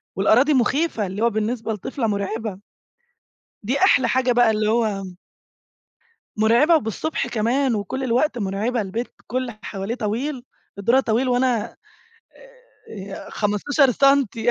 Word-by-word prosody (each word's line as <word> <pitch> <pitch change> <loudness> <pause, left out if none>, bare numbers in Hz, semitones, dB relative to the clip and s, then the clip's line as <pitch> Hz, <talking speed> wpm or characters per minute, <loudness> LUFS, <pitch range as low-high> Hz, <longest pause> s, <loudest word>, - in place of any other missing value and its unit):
والأراضي 245 +9 +4
مخيفة 260 - +1
اللي 195 +4 -5
هو 235 - +4
بالنسبة 220 +1 -2
لطفلة 225 +3 -3
مرعبة، 205 0 -3 1.0
دي 255 +7 -1
أحلى 370 -8 +4
حاجة 255 -1 +2
بقى 240 -1 +4
اللي 215 0 0
هو 215 -4 0 1.3
مرعبة 235 +10 +4
وبالصبح 285 +4 -2
كمان 240 +3 0
وكل 240 +6 -3
الوقت 255 +3 +1
مرعبة 215 +4 -1
البيت 215 +5 -4 0.2
كل 255 - -2
اللي 235 -4 -7
حواليه 195 +3 -4
طويل، 245 +4 -3 0.3
الدُرة 235 +6 +3
طويل 250 +1 0
وأنا 245 -3 0 1.1
آآ، 195 -2 -8
15 250 +7 +1
سنتي 270 -4 +2
235 Hz, 125 wpm, -22 LUFS, 210-260 Hz, 1.3 s, والأراضي